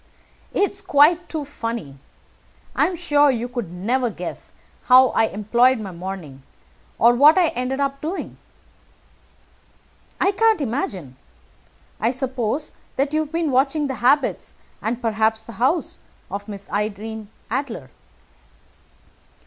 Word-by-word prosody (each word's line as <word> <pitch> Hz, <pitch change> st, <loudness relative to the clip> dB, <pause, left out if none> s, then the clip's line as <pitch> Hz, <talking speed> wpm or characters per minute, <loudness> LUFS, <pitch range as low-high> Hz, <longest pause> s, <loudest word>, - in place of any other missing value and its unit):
"It's 400 Hz, 0 st, 0 dB
quite 340 Hz, 0 st, +4 dB
too 310 Hz, -3 st, -4 dB
funny. 230 Hz, -, -5 dB, 0.8 s
I -, -, +3 dB
am 365 Hz, -, -4 dB
sure 290 Hz, -3 st, +3 dB
you 240 Hz, -2 st, -1 dB
could 240 Hz, -8 st, -5 dB
never 235 Hz, +8 st, 0 dB
guess 180 Hz, -4 st, -7 dB, 0.3 s
how 255 Hz, 0 st, +7 dB
I -, -, +2 dB
employed 235 Hz, +5 st, +2 dB
my 200 Hz, -3 st, -6 dB
morning, 175 Hz, -6 st, -7 dB, 0.6 s
or 235 Hz, +1 st, +6 dB
what 290 Hz, +7 st, +6 dB
I 350 Hz, -3 st, +4 dB
ended 255 Hz, +2 st, -2 dB
by 280 Hz, -1 st, +1 dB
doing." 335 Hz, +5 st, -5 dB, 1.8 s
"I 390 Hz, -, +3 dB
can't 440 Hz, 0 st, +3 dB
imagine. 200 Hz, -, -3 dB, 0.8 s
I 225 Hz, -, +2 dB
suppose 260 Hz, +1 st, -2 dB, 0.2 s
that 275 Hz, +2 st, 0 dB
you 310 Hz, -, +2 dB
have 300 Hz, -, -15 dB
been 330 Hz, -3 st, 0 dB
watching 275 Hz, +4 st, +2 dB
the 270 Hz, -, -2 dB
habits, 270 Hz, +4 st, +2 dB, 0.3 s
and, 230 Hz, +2 st, -2 dB
perhaps, 220 Hz, 0 st, +1 dB
the -, -, -9 dB
house, 305 Hz, +7 st, +1 dB, 0.3 s
of 200 Hz, +1 st, -5 dB
Miss 200 Hz, -2 st, -8 dB
Irene 215 Hz, +1 st, -3 dB, 0.2 s
Adler." 230 Hz, -, -3 dB
250 Hz, 130 wpm, -22 LUFS, 215-290 Hz, 1.8 s, how